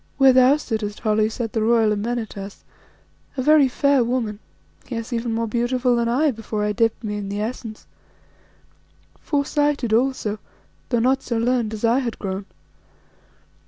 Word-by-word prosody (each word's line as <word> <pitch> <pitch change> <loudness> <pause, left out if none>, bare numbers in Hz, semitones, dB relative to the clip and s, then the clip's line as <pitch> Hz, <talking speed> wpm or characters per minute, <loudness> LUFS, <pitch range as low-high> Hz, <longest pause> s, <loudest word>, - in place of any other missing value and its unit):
Where 270 -2 +6
thou 260 +3 +6
sittest, 215 -7 -4
Holly, 215 -1 +2
sat 225 0 -4
the 225 - 0
royal 225 -1 +3
Amenartas, 210 -2 -4 0.7
a 260 - -1
very 300 -1 +6
fair 280 0 +2
woman; 230 -4 -2 0.5
yes, 230 0 -4
even 230 0 -2
more 230 +1 -1
beautiful 240 +2 +1
than 235 0 0
I 285 +5 +2
before 220 -2 -4
I 210 - +1
dipped 225 +1 0
me 210 -1 -3
in 200 -1 -5
the 200 +1 -3
Essence, 220 0 -5 1.3
fore 285 -2 -1
sighted 290 -6 0
also, 225 -3 0 0.5
though 240 - +1
not 260 +3 +2
so 235 - -3
learned 235 -1 +1
as 215 - -2
I 235 +3 +3
had 240 -4 -3
grown. 195 0 -5
235 Hz, 160 wpm, -22 LUFS, 215-255 Hz, 1.3 s, Where